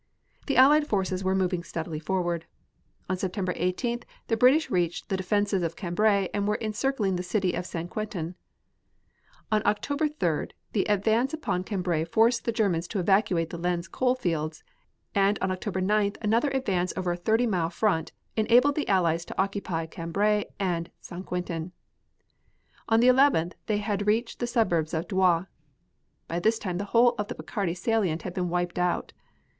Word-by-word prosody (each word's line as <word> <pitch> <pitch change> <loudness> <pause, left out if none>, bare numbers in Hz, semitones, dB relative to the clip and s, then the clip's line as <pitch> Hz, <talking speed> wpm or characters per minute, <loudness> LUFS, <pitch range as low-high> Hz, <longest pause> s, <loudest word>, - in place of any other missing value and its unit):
The 275 - +1
Allied 295 +3 +6
forces 190 -4 -1
were 190 0 +1
moving 180 -2 0
steadily 165 -2 -5
forward. 175 0 -2 0.6
On 185 - 0
September 185 0 -2
18th 235 +8 -1 0.3
the 225 - +3
British 260 +8 +4
reached 175 -2 -1
the 195 - +1
defenses 200 +1 +1
of 165 -1 -2
Cambrai 200 +1 +1
and 205 0 0
were 210 +1 +1
encircling 215 -3 -1
the - - -2
city 185 0 0
of 180 - -3
St. 170 0 -4
Quentin. 180 -4 -4 1.2
On 215 -1 +3
October 285 +8 +1
3d 175 - -2 0.2
the 200 - +1
advance 220 +7 +2
upon 185 - -2
Cambrai 180 -5 -1
forced 225 +7 +2
the 235 - +1
Germans 195 -7 0
to 210 - -4
evacuate 180 -3 +2
the 170 - -6
Lens 175 0 -1
coal 255 0 +1
fields, 165 -9 -2 0.5
and 200 0 +3
on 190 - 0
October 190 0 -3
9th 205 +1 +1
another 230 +7 +2
advance 195 -10 0
over 180 -1 0
a - - -1
thirty 220 +7 +1
mile 180 -7 0
front 170 -2 0 0.2
enabled 245 +6 +4
the 300 - -2
Allies 170 -4 +2
to - - -8
occupy 190 -4 -1
Cambrai 200 +6 0
and 175 -3 -1
St. 180 +1 -8
Quentin. 180 -1 -4 1.2
On 225 0 +4
the 245 - +5
11th 255 - +4
they 215 - +1
had 205 -1 -2
reached 225 +3 +1
the 240 - -1
suburbs 170 -10 +1
of 160 +2 -2
Douai. 185 -4 +3 0.8
By 170 - -2
this 220 +5 +2
time 180 -5 -3
the 200 - -2
whole 235 +3 +4
of 210 - -1
the - - -5
Picardy 180 -5 -3
salient 185 -4 0
had 180 - -5
been 180 -1 -1
wiped 175 0 -1
out. 180 0 0
190 Hz, 170 wpm, -27 LUFS, 175-220 Hz, 1.2 s, Allied